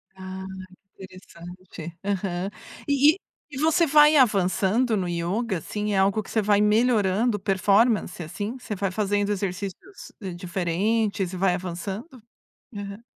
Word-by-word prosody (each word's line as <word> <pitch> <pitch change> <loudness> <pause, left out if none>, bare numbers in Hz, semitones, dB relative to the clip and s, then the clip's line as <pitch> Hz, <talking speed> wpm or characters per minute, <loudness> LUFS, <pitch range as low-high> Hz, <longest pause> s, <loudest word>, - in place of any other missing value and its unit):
Ah, 190 0 -7 0.5
interessante. 180 -2 -11
Aham. 195 -1 -2 0.4
E 285 +2 +5
e - - -14 0.3
e 265 - -7
você 320 +2 +3
vai 300 +1 +6
avançando 210 +1 +2
no 180 -2 -1
ioga, 180 +4 -2
assim, 210 +5 -3
é - - +1
algo 195 +3 +2
que - - -14
você 220 - +2
vai 205 0 +3
melhorando 210 0 +2
performance, 200 0 +2
assim? 205 +10 -5
Você 215 - -5
vai 195 0 -2
fazendo 205 0 0
exercícios 200 - -5 0.2
diferentes 190 +3 -1
e 185 - -6
vai 185 -1 +2
avançando? 190 - -6 0.5
Aham. 200 +2 -7
200 Hz, 130 wpm, -25 LUFS, 185-220 Hz, 0.5 s, vai